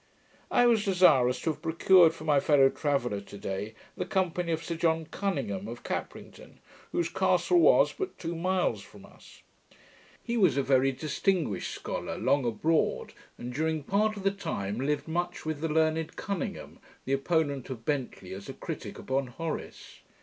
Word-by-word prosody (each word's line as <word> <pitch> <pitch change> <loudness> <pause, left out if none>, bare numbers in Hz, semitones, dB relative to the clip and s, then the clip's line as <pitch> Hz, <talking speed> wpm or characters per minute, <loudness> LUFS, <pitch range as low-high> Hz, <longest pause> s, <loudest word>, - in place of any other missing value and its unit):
I 245 - +4
was 230 -3 +4
desirous 160 -11 +4
to 160 - 0
have - - -10
procured 170 +1 +5
for 155 - -10
my 150 -3 +3
fellow 140 -1 +5
traveller, 130 -10 -1
to 100 0 -11
day, 100 +3 -5 0.2
the - - -2
company 180 -2 0
of 160 0 -2
Sir 170 - -3
John 160 -1 +1
Cuninghame, 140 - -3
of 120 +1 -8
Caprington, - - -6 0.3
whose 170 - 0
castle 190 - +2
was - - +5
but 385 -1 -5
two 170 0 -4
miles 185 +2 0
from - - -14
us. - - -18 0.8
He 235 0 -2
was 185 - +4
a 140 - +2
very 135 0 +3
distinguished 150 - -1
scholar, - - -5
long 140 -2 +2
abroad, 155 +8 0 0.2
and 120 +1 -6
during 155 +2 -1
part 210 +6 +1
of 195 - -7
the 195 - +3
time 120 - -4
lived 145 +4 -1
much 175 +1 -3
with 155 -2 -3
the 165 - -1
learned 160 +1 +1
Cuninghame, 195 -4 -5 0.3
the 135 - -1
opponent 140 -2 0
of 115 -4 -7
Bentley 125 -10 -3
as 100 +1 -9
a - - -5
critick - - -7
upon 130 0 -2
Horace. 160 +6 -6
155 Hz, 170 wpm, -29 LUFS, 130-175 Hz, 0.8 s, procured